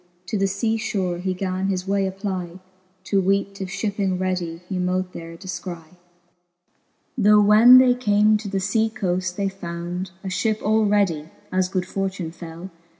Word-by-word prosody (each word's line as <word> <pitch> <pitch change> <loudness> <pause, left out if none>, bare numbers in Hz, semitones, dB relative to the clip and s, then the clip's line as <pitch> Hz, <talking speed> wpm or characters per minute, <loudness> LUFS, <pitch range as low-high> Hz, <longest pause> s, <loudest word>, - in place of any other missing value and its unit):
To - - -2
the 195 -1 +1
lea 225 0 +2
fhore 185 -5 -2
he 185 0 -2
gan 185 0 -2
his 185 -1 -2
way 195 -1 +1
SEpply, 190 -2 -5 0.4
To 195 0 +1
weete 195 +1 0
if 190 - -4
(hipping 200 -1 -1
readie 180 -3 -2
he 185 -1 -3
mote 180 0 -1
there 165 0 -8
de{cry. 175 -2 -7 1.2
Tho 210 -2 +5
when 215 +5 +8
they 255 -1 +6
came 215 -3 +3
to 210 0 -7
the 195 0 -1
fea 220 +3 +1
coaft, 185 -4 -2
they 200 0 -1
found 175 -1 -5
A - - -5
fhip 215 +3 0
all 215 +1 +3
readie, 180 -7 +1 0.2
as 185 0 +1
good 185 -1 -1
fortune 190 -3 -3
fell. 170 +2 -9
190 Hz, 165 wpm, -23 LUFS, 180-205 Hz, 1.2 s, when